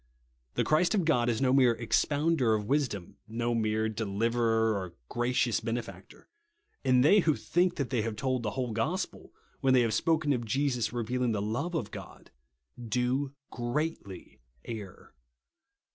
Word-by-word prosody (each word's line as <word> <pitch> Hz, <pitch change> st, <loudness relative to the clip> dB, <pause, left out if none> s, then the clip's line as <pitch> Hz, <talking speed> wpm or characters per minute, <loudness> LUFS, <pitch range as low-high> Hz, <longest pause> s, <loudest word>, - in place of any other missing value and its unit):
The -, -, +2 dB
Christ 170 Hz, +7 st, +2 dB
of 190 Hz, -5 st, +1 dB
God 120 Hz, -7 st, +2 dB
is 120 Hz, +3 st, 0 dB
no 130 Hz, -1 st, +3 dB
mere 130 Hz, -3 st, +5 dB
expounder 140 Hz, +1 st, +2 dB
of 105 Hz, -1 st, -3 dB
wisdom; 115 Hz, -8 st, -1 dB
no 120 Hz, +2 st, -1 dB
mere 110 Hz, -1 st, +1 dB
deliverer 110 Hz, +1 st, +1 dB
or 95 Hz, -3 st, -5 dB
gracious 120 Hz, -2 st, +1 dB
benefactor; 115 Hz, +1 st, -6 dB, 0.6 s
and 125 Hz, 0 st, +4 dB
they 205 Hz, +7 st, +7 dB
who 160 Hz, -5 st, +2 dB
think 180 Hz, +1 st, +1 dB
that 140 Hz, -4 st, -3 dB
they 120 Hz, -4 st, +1 dB
have 110 Hz, 0 st, -3 dB
told 130 Hz, +2 st, -1 dB
the 110 Hz, -, -2 dB
whole 125 Hz, -3 st, -1 dB
gospel, 155 Hz, -, -3 dB, 0.3 s
when 130 Hz, -2 st, +3 dB
they 125 Hz, -, +6 dB
have 115 Hz, -2 st, +1 dB
spoken 155 Hz, -3 st, +2 dB
of 120 Hz, -2 st, -2 dB
Jesus 125 Hz, -1 st, 0 dB
revealing 120 Hz, 0 st, -1 dB
the 105 Hz, -, -1 dB
love 120 Hz, -, -2 dB
of 110 Hz, -9 st, -2 dB
God, 95 Hz, -4 st, -10 dB, 0.5 s
do 125 Hz, +5 st, -1 dB, 0.2 s
greatly 120 Hz, -, -4 dB, 0.3 s
err. 105 Hz, -5 st, -8 dB
120 Hz, 155 wpm, -29 LUFS, 110-140 Hz, 0.6 s, they